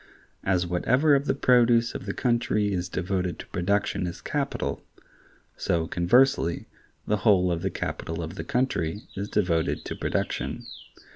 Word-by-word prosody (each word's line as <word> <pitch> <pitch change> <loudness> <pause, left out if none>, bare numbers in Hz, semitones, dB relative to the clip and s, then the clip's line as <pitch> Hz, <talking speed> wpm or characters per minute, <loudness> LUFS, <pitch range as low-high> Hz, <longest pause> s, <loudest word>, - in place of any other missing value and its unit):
As 90 -2 +1
whatever 125 - +2
of 140 +1 +2
the - - +2
produce 120 -3 +4
of 135 - -7
the - - -1
country 115 -4 +1
is 90 -1 -2
devoted 90 -1 -2
to - - -8
production 95 0 0
is 85 - -6
capital, 140 - -2 0.7
so, 85 -1 0
conversely, 90 +1 +2 0.4
the 105 - +1
whole 95 -4 +3
of 85 -1 -1
the - - 0
capital 80 +1 -4
of 80 +2 -6
the - - -5
country 110 -7 -1
is 100 +2 -4
devoted 85 -5 0
to - - -4
production. - - -2
100 Hz, 150 wpm, -26 LUFS, 85-120 Hz, 0.7 s, produce